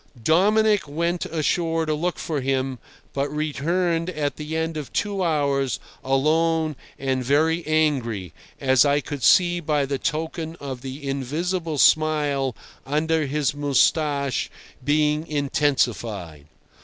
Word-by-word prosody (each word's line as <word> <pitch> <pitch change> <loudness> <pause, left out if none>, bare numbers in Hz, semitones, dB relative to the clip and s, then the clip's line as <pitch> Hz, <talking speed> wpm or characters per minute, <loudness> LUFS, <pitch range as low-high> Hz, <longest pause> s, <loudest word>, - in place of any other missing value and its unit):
Dominic 205 - +3
went 170 +4 -1
ashore 165 +1 0
to 155 - 0
look 170 +4 -1
for 150 -4 -3
him, 130 -1 -1 0.3
but 140 +1 -1
returned 165 +3 -1
at 150 -5 -2
the 155 +1 -4
end 160 0 -2
of 150 -3 -6
two 200 -2 -1
hours 140 -5 0 0.2
alone 155 +4 +1 0.2
and 130 -1 -1
very 160 +6 +2
angry, 130 - 0 0.3
as 130 -2 +4
I 145 0 +3
could 145 -1 -6
see 175 +6 +5
by 150 -3 0
the 135 0 -3
token 160 +1 -3
of 135 -6 -7
the 135 +2 -7
invisible 155 +5 -2
smile 145 -4 +3 0.3
under 155 +2 0
his 145 -1 0
moustache 145 -1 +1 0.3
being 150 +2 +1
intensified. 120 - -1
150 Hz, 125 wpm, -23 LUFS, 135-160 Hz, 0.3 s, see